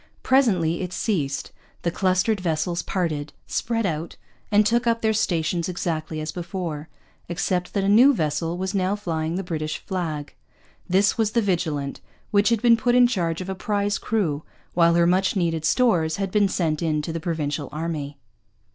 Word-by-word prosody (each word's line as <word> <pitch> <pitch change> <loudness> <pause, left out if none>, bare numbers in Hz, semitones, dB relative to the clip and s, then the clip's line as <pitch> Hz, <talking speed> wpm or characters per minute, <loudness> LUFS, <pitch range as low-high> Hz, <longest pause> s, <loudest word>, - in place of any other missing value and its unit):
Presently 190 -12 +3
it 180 -1 -4
ceased; 145 - -1 0.3
the 170 - +1
clustered 190 +4 +1
vessels 170 0 -1
parted; 155 -6 -2
spread 230 -1 -1
out; 165 -2 -3 0.4
and 210 0 +5
took 235 +3 +2
up 230 0 +1
their 220 0 +3
stations 170 -4 0
exactly 160 -3 -3
as 155 0 -3
before, 170 -4 -5 0.4
except 180 +1 -1
that 200 - +1
a - - +1
new 235 +8 +7
vessel 165 - -1
was 190 +2 -3
now 190 0 +1
flying 165 -5 -2
the 190 - -2
British 155 -3 -3
flag. 160 -6 -4 0.6
This 195 +5 +3
was 215 -1 +1
the 235 - +3
Vigilant, 160 -7 -1 0.3
which 205 +1 +4
had 230 -1 +1
been 235 -1 +6
put 245 +2 +2
in 250 0 +7
charge 175 -8 0
of 185 - -6
a - - -1
prize 205 +1 -1
crew, 170 -10 -1 0.3
while 170 -1 +4
her 170 0 +4
much 185 +3 +2
needed 165 -4 0
stores 165 -8 +2
had 195 -1 -3
been 205 -1 +3
sent 160 -5 -1
in 155 -2 0
to 165 - -4
the 165 - -2
Provincial 155 -3 -2
army. 150 -2 -4
175 Hz, 175 wpm, -24 LUFS, 160-205 Hz, 0.6 s, new